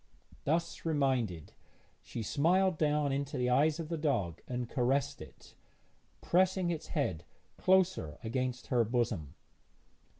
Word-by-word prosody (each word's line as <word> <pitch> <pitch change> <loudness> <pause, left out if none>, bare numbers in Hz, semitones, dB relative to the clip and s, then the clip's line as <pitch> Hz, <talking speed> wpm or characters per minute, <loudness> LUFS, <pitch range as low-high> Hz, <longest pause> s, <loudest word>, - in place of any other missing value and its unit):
Thus 165 +3 -1
reminded, 130 - 0 0.5
she 115 - -6
smiled 175 - +2
down 150 -2 +2
into 140 +1 -2
the 125 0 +1
eyes 150 +5 +3
of 160 -2 -5
the 165 -2 -2
dog 100 - -1
and 125 -1 -3
caressed 130 +2 0
it, - - -13 0.7
pressing 185 0 +2
its 160 -2 -4
head 90 - -1 0.4
closer 185 - +2
against 125 +2 -2
her 120 -1 +4
bosom. 110 - -1
140 Hz, 125 wpm, -32 LUFS, 120-165 Hz, 0.7 s, her